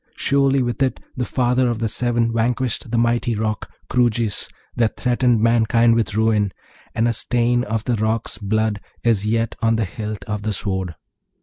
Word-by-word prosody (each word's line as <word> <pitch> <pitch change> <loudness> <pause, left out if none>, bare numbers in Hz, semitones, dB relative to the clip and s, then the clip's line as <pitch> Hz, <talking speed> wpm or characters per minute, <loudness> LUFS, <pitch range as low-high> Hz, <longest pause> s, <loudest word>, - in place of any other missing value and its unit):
Surely, 135 -1 +2
with 120 +2 -3
it 130 -3 +1 0.2
the 125 - -1
father 125 0 +2
of 120 - -1
the 115 0 -1
Seven 115 0 0
vanquished 120 +1 -1
the 120 - 0
mighty 120 0 +1
Roc, 110 0 -2 0.2
Kroojis, 120 -4 +1 0.3
that 115 -2 +1
threatened 125 -2 +2
mankind 115 0 +4
with 115 -2 0
ruin, 110 -3 +2 0.4
and 115 +1 +2
a 120 - +1
stain 120 +1 +1
of 110 +1 -2
the 125 - 0
Roc's 110 +1 -1
blood 110 0 0 0.2
is 105 -3 +2
yet 115 +1 0
on 115 0 +3
the 110 -1 0
hilt 105 +2 -6
of 105 -2 -4
the 110 0 -2
sword. 95 -4 -3
115 Hz, 175 wpm, -21 LUFS, 110-120 Hz, 0.4 s, mankind